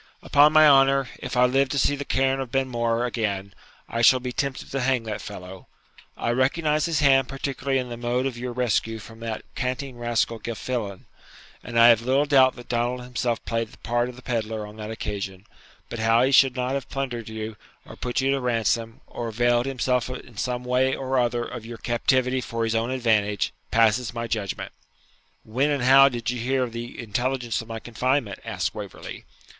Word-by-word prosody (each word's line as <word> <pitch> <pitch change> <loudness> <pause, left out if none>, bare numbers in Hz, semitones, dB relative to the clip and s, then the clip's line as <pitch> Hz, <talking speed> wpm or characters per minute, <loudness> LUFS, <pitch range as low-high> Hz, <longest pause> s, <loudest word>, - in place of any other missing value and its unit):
Upon 145 +1 +5
my 155 0 +7
honour, 135 -2 +5
if 125 0 -5
I 125 - +6
live 135 +2 +2
to 140 - -2
see 145 +1 +2
the 140 - -5
cairn 135 0 +1
of 130 -3 -5
Benmore 120 -3 0
again, 100 -5 -2 0.3
I 115 - -2
shall 130 +2 +6
be 125 0 -4
tempted 140 +1 -3
to 135 - -1
hang 130 -2 +1
that 110 -2 -5
fellow! 90 +1 -9 0.5
I 115 - -1
recognise 150 +5 +1
his 165 -3 0
hand 135 -2 +5
particularly 135 0 -2
in 125 -1 -2
the 120 - -6
mode 120 +2 -1
of 135 -3 -2
your 125 +1 -5
rescue 115 -2 0
from 115 +1 -12
that 115 -1 -5
canting 130 0 -3
rascal 120 -1 0
Gilfillan, 110 -3 -4 0.6
and 115 - -4
I 115 +1 +9
have 115 -1 +5
little 130 +4 +2
doubt 135 -3 +5
that 120 - -12
Donald 120 +1 -1
himself 120 -1 -2
played 115 -1 -2
the - - -15
part 120 +1 -1
of 125 - -10
the 125 - -14
pedlar 110 -2 -2
on 105 +1 -12
that 105 0 -6
occasion; 100 -3 -5 0.4
but 115 - -6
how 115 +2 +4
he 135 - +2
should 135 -1 +5
not 125 0 -1
have 140 -1 -3
plundered 120 -5 -4
you, 110 0 -5 0.3
or - - -11
put 125 +1 -2
you 135 +1 +2
to 135 -1 0
ransom, 115 -1 0
or 120 - -6
availed 120 +2 +1
himself 125 -2 0
in 125 -2 -8
some 125 +3 -2
way 130 +1 +1
or 130 -1 -1
other 120 -1 0
of 120 -2 -7
your 115 +1 -8
captivity 130 +2 +1
for 115 -2 -3
his 115 0 0
own 115 +1 0
advantage, 110 -5 +1 0.2
passes 115 +1 +2
my 115 0 -2
judgment.' 110 -4 -3 0.7
'When 130 +7 0
and 140 -4 0
how 135 +2 +7
did 120 -1 -3
you 125 - -4
hear 130 +2 +1
the 120 +1 -7
intelligence 120 +1 -2
of 115 - -12
my 115 -1 -5
confinement?' 120 -1 -1
asked - - -2
Waverley. - - -8
120 Hz, 200 wpm, -24 LUFS, 115-130 Hz, 0.7 s, I